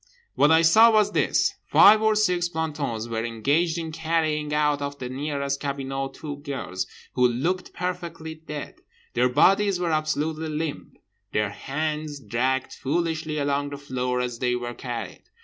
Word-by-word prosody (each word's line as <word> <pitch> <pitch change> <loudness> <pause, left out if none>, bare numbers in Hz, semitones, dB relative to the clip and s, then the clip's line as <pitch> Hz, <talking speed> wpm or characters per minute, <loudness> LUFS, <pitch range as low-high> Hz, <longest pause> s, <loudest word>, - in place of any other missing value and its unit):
What 145 - +4
I 160 +1 +5
saw 220 +8 +7
was 210 -2 +3
this: - - +2
five 215 +1 +7
or 220 0 +3
six 180 -5 +2
plantons 145 -9 -3
were 115 -1 -2
engaged 140 +9 +1
in 165 -1 -4
carrying 155 -2 -1
out 150 -1 +1
of 140 0 -4
the 125 -2 -5
nearest 140 +1 -2
cabinot 135 -1 -3
two 145 -2 -6
girls, 135 - -4 0.3
who 125 0 +4
looked 165 +10 -2
perfectly 170 -3 -4
dead. 155 -2 -8 0.4
Their 125 +1 +3
bodies 195 +8 +4
were 175 -2 0
absolutely 155 +1 -1
limp. 155 0 -4 0.4
Their 105 -1 +1
hands 150 +4 -3
dragged 130 +1 -1
foolishly 160 +1 -2
along 145 0 0
the 140 - -6
floor 125 -3 -2
as 120 -2 -4
they 125 -1 +1
were 120 0 -4
carried. 120 -1 -6
150 Hz, 155 wpm, -25 LUFS, 130-160 Hz, 0.4 s, saw